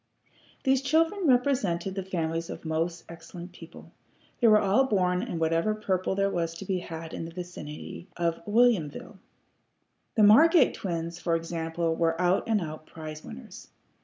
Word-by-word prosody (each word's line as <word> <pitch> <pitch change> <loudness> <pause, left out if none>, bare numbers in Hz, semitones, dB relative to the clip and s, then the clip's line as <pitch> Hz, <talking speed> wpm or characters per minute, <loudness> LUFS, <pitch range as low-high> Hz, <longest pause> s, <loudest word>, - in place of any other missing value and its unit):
These 265 -1 +3
children 325 +6 +1
represented 245 -9 +1
the 195 - -3
families 165 -3 -3
of - - -8
most 165 +2 -2
excellent 170 +1 -10
people. 170 -2 -13 0.5
They 240 - +4
were 215 -1 +7
all 210 +6 +3
born 180 -6 +1
in 170 - -4
whatever 165 +6 +1
purple 190 -3 -1
there 195 0 +1
was 165 -2 -2
to 195 - -8
be 185 -1 -1
had 165 -2 -8
in - - -5
the - - -7
vicinity 175 -2 -8
of 170 -1 -1
Whilomville. 210 -4 +1 1.0
The 220 - +4
Margate 310 - +6
twins, 170 -2 -4
for 170 -1 0
example, 165 0 -2
were 165 0 0
out 180 +5 +1
and 215 -3 +2
out 155 -1 -7
prize 155 -1 -8
winners. 65 - -11
175 Hz, 160 wpm, -27 LUFS, 165-210 Hz, 1.0 s, were